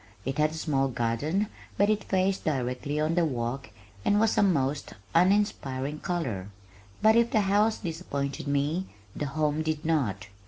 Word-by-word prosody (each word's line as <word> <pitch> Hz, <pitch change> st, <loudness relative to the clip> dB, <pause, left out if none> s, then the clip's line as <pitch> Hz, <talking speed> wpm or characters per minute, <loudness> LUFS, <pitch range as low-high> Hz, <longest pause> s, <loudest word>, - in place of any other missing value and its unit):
It 135 Hz, +3 st, -2 dB
had 150 Hz, 0 st, +4 dB
a 155 Hz, -, -8 dB
small 140 Hz, -4 st, +1 dB
garden 130 Hz, -, 0 dB, 0.3 s
but 200 Hz, -, +4 dB
it 215 Hz, -1 st, +1 dB
faced 190 Hz, 0 st, +1 dB
directly 135 Hz, +1 st, -1 dB
on 155 Hz, +2 st, +1 dB
the 175 Hz, 0 st, +3 dB
walk 130 Hz, -2 st, -2 dB, 0.3 s
and 205 Hz, -, +3 dB
was 220 Hz, 0 st, +3 dB
a -, -, +4 dB
most 145 Hz, -7 st, +1 dB, 0.2 s
uninspiring 165 Hz, -7 st, +1 dB
color. 130 Hz, -, -2 dB, 0.6 s
But 220 Hz, +1 st, +6 dB
if 235 Hz, 0 st, +4 dB
the 225 Hz, -4 st, +3 dB
house 205 Hz, +3 st, +3 dB
disappointed 145 Hz, -6 st, -4 dB
me 145 Hz, +6 st, 0 dB, 0.3 s
the 145 Hz, -, -2 dB
home 150 Hz, +1 st, 0 dB
did 155 Hz, 0 st, -2 dB
not. 120 Hz, -12 st, 0 dB
155 Hz, 160 wpm, -28 LUFS, 135-190 Hz, 0.6 s, But